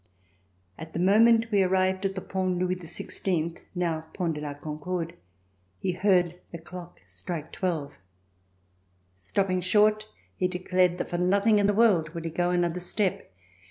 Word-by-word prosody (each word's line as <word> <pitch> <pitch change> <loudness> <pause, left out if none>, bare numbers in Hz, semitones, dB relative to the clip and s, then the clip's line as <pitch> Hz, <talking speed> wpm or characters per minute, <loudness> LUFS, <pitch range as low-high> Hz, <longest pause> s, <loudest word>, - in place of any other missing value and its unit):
At 160 +1 -9
the - - -3
moment 225 +5 +5
we 200 -2 +4
arrived 190 +1 +1
at 195 0 -1
the 190 - -3
Pont 185 -1 -1
Louis 180 +1 0
XVI 170 -1 -3 0.2
(now 170 -3 -1
Pont 175 -4 -1
de 150 - -6
la 145 -1 -5
Concorde) 160 +3 -4 0.6
he 140 - -1
heard 180 -2 +2
the 170 - -6
clock 175 +1 -10
strike 165 -4 -6
twelve. 165 -6 -3 1.2
Stopping 185 - -1
short, 210 +3 +3 0.3
he 185 - +1
declared 180 0 +1
that - - -4
for 175 - -1
nothing 200 +4 +3
in 200 - +3
the 205 - +2
world 180 -8 +3
would 165 0 -5
he 165 - -3
go 175 +2 0
another 175 -1 +1
step. 185 - -2
180 Hz, 160 wpm, -27 LUFS, 170-190 Hz, 1.2 s, moment